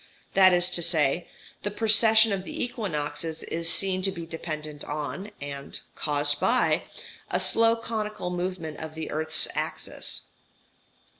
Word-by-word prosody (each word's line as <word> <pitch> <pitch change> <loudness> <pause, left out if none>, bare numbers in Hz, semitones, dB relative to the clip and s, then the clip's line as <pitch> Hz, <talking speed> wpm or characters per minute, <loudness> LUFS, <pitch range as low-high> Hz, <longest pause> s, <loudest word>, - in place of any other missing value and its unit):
That 190 -1 +7
is 180 0 +3
to 175 - +1
say, 165 -1 +2 0.3
the 205 - -1
precession 220 +1 +5
of 195 -2 -1
the - - -4
equinoxes 160 -9 -3
is 165 0 -2
seen 190 -1 +1
to 195 +1 +4
be 170 -3 -6
dependent 155 -2 -5
on, 150 +7 -4
and 140 -1 -5
caused 145 -1 +1
by, 250 +1 +2 0.4
a - - 0
slow 230 0 +4
conical 215 -5 -4
movement 175 -3 -4
of 155 0 -7
the 160 -1 -5
earth's 155 +1 +1
axis. - - -3
175 Hz, 140 wpm, -27 LUFS, 155-205 Hz, 0.4 s, That